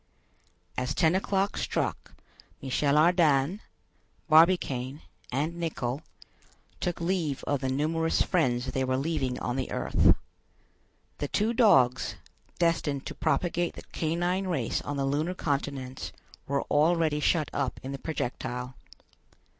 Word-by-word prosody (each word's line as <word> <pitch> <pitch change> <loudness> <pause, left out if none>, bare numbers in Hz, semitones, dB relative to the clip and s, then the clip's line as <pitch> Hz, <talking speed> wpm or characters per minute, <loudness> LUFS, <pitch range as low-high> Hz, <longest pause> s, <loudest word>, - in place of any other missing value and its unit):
As 130 +2 -2
ten 160 -1 +3
o'clock 195 +1 0
struck, - - -2 0.4
Michel 140 +2 +1
Ardan, 160 0 +4 0.7
Barbicane, 155 -5 +3 0.3
and 150 +7 -1
Nicholl, 135 -5 -2 0.8
took 175 -2 -2
leave 170 -5 -1
of 145 - 0
the 130 0 -2
numerous 160 +4 +1
friends 130 -9 +1
they 130 +1 0
were 130 0 0
leaving 135 -3 -1
on 125 +1 -2
the 130 - -2
earth. - - +3 1.0
The 145 - -1
two 215 +9 +1
dogs, 135 - +4 0.4
destined 160 -5 0
to - - -5
propagate 170 +3 0
the - - -9
canine 175 +4 -1
race 135 -11 -1
on 145 - -4
the 135 - 0
lunar 150 +6 0
continents, 140 -4 -3 0.4
were 140 0 0
already 155 0 +2
shut 155 0 +1
up 135 -3 -2
in 135 - -5
the 140 - -5
projectile. 125 -4 -4
150 Hz, 125 wpm, -28 LUFS, 135-170 Hz, 1.0 s, Ardan